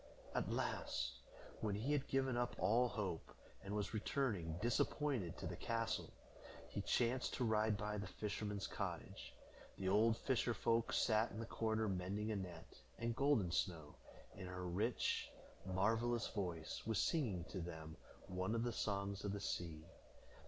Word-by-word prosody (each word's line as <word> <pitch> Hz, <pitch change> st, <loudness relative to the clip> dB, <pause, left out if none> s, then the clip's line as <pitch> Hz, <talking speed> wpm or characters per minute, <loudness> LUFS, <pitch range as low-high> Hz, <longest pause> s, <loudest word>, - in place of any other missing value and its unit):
At -, -, 0 dB
last, -, -, 0 dB, 0.5 s
when 105 Hz, -3 st, 0 dB
he 115 Hz, +8 st, 0 dB
had 140 Hz, -2 st, +1 dB
given 135 Hz, -2 st, +2 dB
up 120 Hz, 0 st, 0 dB
all 115 Hz, +7 st, +4 dB
hope, 100 Hz, -9 st, -3 dB, 0.3 s
and 100 Hz, +1 st, -3 dB
was 105 Hz, 0 st, -1 dB
returning 105 Hz, -, 0 dB
disappointed 120 Hz, -, +1 dB
to -, -, -5 dB
the -, -, -2 dB
castle, 115 Hz, 0 st, -1 dB, 0.6 s
he -, -, -2 dB
chanced 125 Hz, +2 st, +2 dB
to 125 Hz, -, 0 dB
ride 110 Hz, -2 st, +3 dB
by 105 Hz, 0 st, -2 dB
the 100 Hz, -, -3 dB
fisherman's 105 Hz, 0 st, -2 dB
cottage. -, -, -4 dB, 0.4 s
The 95 Hz, -1 st, 0 dB
old 110 Hz, +3 st, +5 dB
fisher 120 Hz, -2 st, +1 dB
folk 115 Hz, +2 st, +2 dB
sat 110 Hz, 0 st, +4 dB
in 105 Hz, -, -6 dB
the 115 Hz, -, -2 dB
corner 110 Hz, -1 st, +1 dB
mending 100 Hz, +3 st, -1 dB
a -, -, 0 dB
net, 95 Hz, -3 st, -6 dB, 0.2 s
and 115 Hz, 0 st, -1 dB
Golden 135 Hz, -11 st, +3 dB
Snow, 85 Hz, -5 st, 0 dB, 0.4 s
in 95 Hz, -, -6 dB
her 90 Hz, 0 st, -4 dB
rich, 105 Hz, +7 st, +1 dB, 0.4 s
marvelous 115 Hz, +5 st, +2 dB
voice, 90 Hz, -6 st, -3 dB
was 110 Hz, -2 st, +2 dB
singing 115 Hz, -, +2 dB
to 95 Hz, -, -3 dB
them 80 Hz, -2 st, -6 dB, 0.3 s
one 95 Hz, +3 st, -1 dB
of 115 Hz, -, +1 dB
the 120 Hz, -1 st, 0 dB
songs 100 Hz, -1 st, -1 dB
of 100 Hz, -1 st, -1 dB
the 100 Hz, -, -2 dB
sea. 80 Hz, -5 st, -3 dB
105 Hz, 160 wpm, -41 LUFS, 95-115 Hz, 0.6 s, old